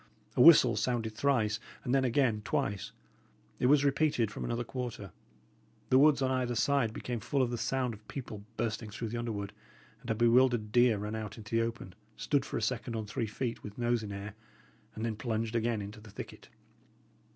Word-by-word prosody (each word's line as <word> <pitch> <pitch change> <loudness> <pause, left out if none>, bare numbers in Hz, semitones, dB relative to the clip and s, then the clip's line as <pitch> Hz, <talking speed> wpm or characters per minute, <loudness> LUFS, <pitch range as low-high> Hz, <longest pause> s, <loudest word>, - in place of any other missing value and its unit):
A - - +4
whistle 130 -6 +8
sounded 115 -3 -1
thrice, 110 -5 +1 0.2
and 125 - -1
then 135 -1 +3
again 120 -3 +2
twice. 100 0 -2 0.7
It 125 - +3
was 145 +1 +5
repeated 140 -6 +2
from - - -6
another 120 +1 -2
quarter. 120 -6 -6 0.8
The 130 - +7
woods 145 -1 +5
on 130 - +1
either 125 -2 0
side 135 -1 +2
became 120 +1 -4
full 135 +5 0
of 120 - -1
the 120 - -2
sound 125 +1 -1
of 110 0 -14
people 110 -7 -7
bursting 110 -1 -2
through 115 +2 -5
the 120 - -4
underwood; 105 -4 -4 0.5
and - - -10
a 110 - +1
bewildered 120 -1 +3
deer 120 -1 +4
ran 105 +2 -4
out 110 -2 -5
into 110 +1 -5
the 115 - +4
open, 115 -5 -4 0.2
stood 135 +5 0
for - - -4
a - - -2
second 120 +1 -2
on 110 -1 -3
three 110 +2 -3
feet, 115 +3 -4
with 105 -1 -9
nose 120 -1 +1
in 105 -2 -6
air, 100 0 -6 0.6
and 110 - -3
then 115 -2 -2
plunged 115 0 -2
again 115 -2 0
into 105 +2 -9
the 110 - -13
thicket. - - -9
115 Hz, 195 wpm, -31 LUFS, 110-125 Hz, 0.8 s, whistle